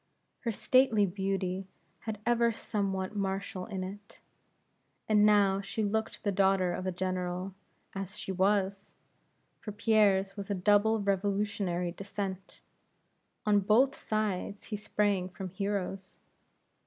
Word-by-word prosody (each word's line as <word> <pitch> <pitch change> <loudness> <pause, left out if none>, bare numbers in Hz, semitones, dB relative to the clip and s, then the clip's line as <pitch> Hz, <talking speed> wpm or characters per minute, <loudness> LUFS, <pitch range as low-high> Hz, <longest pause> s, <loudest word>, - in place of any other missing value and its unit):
Her 235 - -2
stately 230 -2 +4
beauty 190 0 -2 0.4
had 215 -2 -4
ever 235 -1 +3
somewhat 200 -3 -2
martial 195 -1 -3
in 195 -4 -4
it; 200 +2 -9 0.9
and 210 -1 +5
now 200 -2 +4
she 205 +2 -3
looked 220 +2 -2
the 205 - +1
daughter 190 -2 +3
of 185 +1 -4
a - - +1
General, 185 +1 -3 0.4
as 195 0 -5
she - - -4
was; 195 +1 0 0.6
for 210 - -6
Pierre's 205 -2 +3
was 200 -1 -6
a 200 - 0
double 205 +4 +3
revolutionary 195 -3 0
descent. 195 0 -6 0.8
On 210 -1 +4
both 225 +7 +4
sides 205 -2 -2
he 215 - -5
sprang 205 -3 0
from 185 +1 -6
heroes. 195 -1 -3
200 Hz, 125 wpm, -30 LUFS, 190-210 Hz, 0.9 s, and